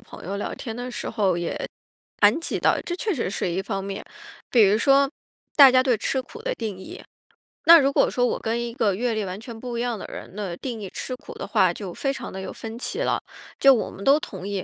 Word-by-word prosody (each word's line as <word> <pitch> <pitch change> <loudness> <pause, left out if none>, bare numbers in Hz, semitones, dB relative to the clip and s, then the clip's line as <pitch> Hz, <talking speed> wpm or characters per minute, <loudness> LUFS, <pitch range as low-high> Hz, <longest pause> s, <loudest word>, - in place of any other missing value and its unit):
朋 - - -13
友 195 +2 -3
聊 205 - -4
天 225 -4 -6
的 245 +1 -5
时 - - -5
候 195 -6 +1
也 170 - -3 0.6
谈 210 +6 +5
及 330 - -3
到， - - +3
这 350 - -4
确 415 +1 -1
实 230 - -2
是 195 - -2
一 185 +3 -1
方 195 -1 -3
面。 195 0 -5 0.5
比 235 -3 +6
如 200 +1 +4
说 275 +4 +4 0.5
大 275 -3 +10
家 255 0 +5
对 255 -3 +2
吃 265 +5 -1
苦 450 - -11
的 - - -2
定 220 -4 -4
义， 190 - -10 0.6
那 335 0 +10
如 275 -1 +2
果 - - +3
说 245 - +1
我 - - -1
跟 230 +1 -1
一 235 -1 -4
个 220 -7 +1
阅 240 +3 0
历 215 -2 -1
完 185 +1 -5
全 225 +1 -9
不 240 0 -5
一 - - -1
样 240 -4 -2
的 - - -7
人， - - -9
那 200 -4 -4
定 235 +4 -5
义 195 - -6
吃 255 - -5
苦 - - -11
的 - - -6
话， 185 -3 +3
就 190 -3 -7
非 275 +7 -1
常 - - -7
地 190 - -6
有 190 - -6
分 225 +1 -8
歧 400 - -4
了。 - - +1 0.4
就 275 -1 +8
我 235 - -1
们 195 - -10
都 275 +2 +6
同 190 - -7
意， 200 -2 -3
230 Hz, 275 characters per minute, -24 LUFS, 195-260 Hz, 0.6 s, 大